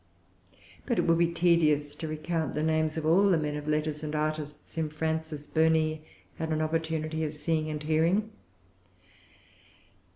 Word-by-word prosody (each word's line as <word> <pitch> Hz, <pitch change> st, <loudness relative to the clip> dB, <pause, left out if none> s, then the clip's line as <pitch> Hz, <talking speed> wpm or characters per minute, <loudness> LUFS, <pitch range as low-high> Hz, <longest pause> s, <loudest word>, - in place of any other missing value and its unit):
But -, -, +1 dB
it -, -, +3 dB
would 165 Hz, 0 st, +3 dB
be 170 Hz, -, +4 dB
tedious 155 Hz, -4 st, +3 dB
to 160 Hz, +2 st, -6 dB
recount 155 Hz, 0 st, -2 dB
the 150 Hz, -, 0 dB
names 155 Hz, 0 st, +1 dB
of 160 Hz, -, -2 dB
all 190 Hz, +6 st, +5 dB
the 180 Hz, -, +4 dB
men 150 Hz, -1 st, -2 dB
of 150 Hz, 0 st, -6 dB
letters 150 Hz, 0 st, -1 dB
and 155 Hz, 0 st, -3 dB
artists 150 Hz, -1 st, -3 dB
whom 160 Hz, -2 st, -1 dB
Frances 160 Hz, -1 st, -3 dB
Burney 160 Hz, 0 st, +2 dB, 0.4 s
had 160 Hz, 0 st, -2 dB
an 155 Hz, -, +1 dB
opportunity 160 Hz, 0 st, -1 dB
of 150 Hz, -1 st, -3 dB
seeing 155 Hz, 0 st, -1 dB
and 155 Hz, 0 st, -4 dB
hearing. 165 Hz, +8 st, +2 dB
155 Hz, 160 wpm, -29 LUFS, 150-160 Hz, 0.4 s, all